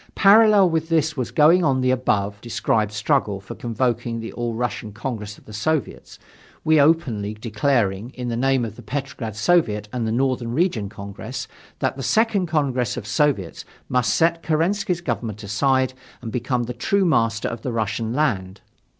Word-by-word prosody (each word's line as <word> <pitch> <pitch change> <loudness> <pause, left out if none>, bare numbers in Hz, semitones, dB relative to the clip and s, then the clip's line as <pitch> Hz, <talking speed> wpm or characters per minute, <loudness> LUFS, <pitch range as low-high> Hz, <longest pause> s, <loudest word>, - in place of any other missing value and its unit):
Parallel 205 -2 +6
with 160 0 -1
this 160 -2 +1
was 130 -4 -2
going 165 +4 +5
on 135 -4 +2
the 130 0 +2
above 105 -5 0
described 110 -2 0
struggle 105 -2 0
for 100 - -9
convoking 120 0 -2
the 115 - -7
All 120 -1 -3
Russian 120 -2 -3
Congress 105 -2 -5
of 105 - -12
Soviets 155 +7 -2 0.5
we, 155 -1 +4
openly 130 -10 +1
declaring, 110 -1 0
in 125 -1 -5
the 120 - -2
name 130 0 +1
of 110 -1 -8
the - - -9
Petrograd 125 -2 -5
Soviet 105 -5 +2
and 120 -3 -1
the - - -1
Northern 125 -1 0
Region 130 - 0
Congress, 100 +4 -7 0.3
that - - -1
the - - -5
Second 215 - +2
Congress 135 -7 0
of - - -5
Soviets 110 - 0 0.3
must 125 -4 +2
set 165 0 +2
Kerensky's 175 +3 0
government 115 - -4
aside 130 +5 +1 0.3
and 115 -2 -7
become 125 +1 -1
the 120 +1 -5
true 195 +10 +1
master 115 -8 +1
of 115 -1 -5
the 125 - -3
Russian 110 0 -2
land. 100 -9 -1
125 Hz, 165 wpm, -22 LUFS, 110-150 Hz, 0.5 s, Parallel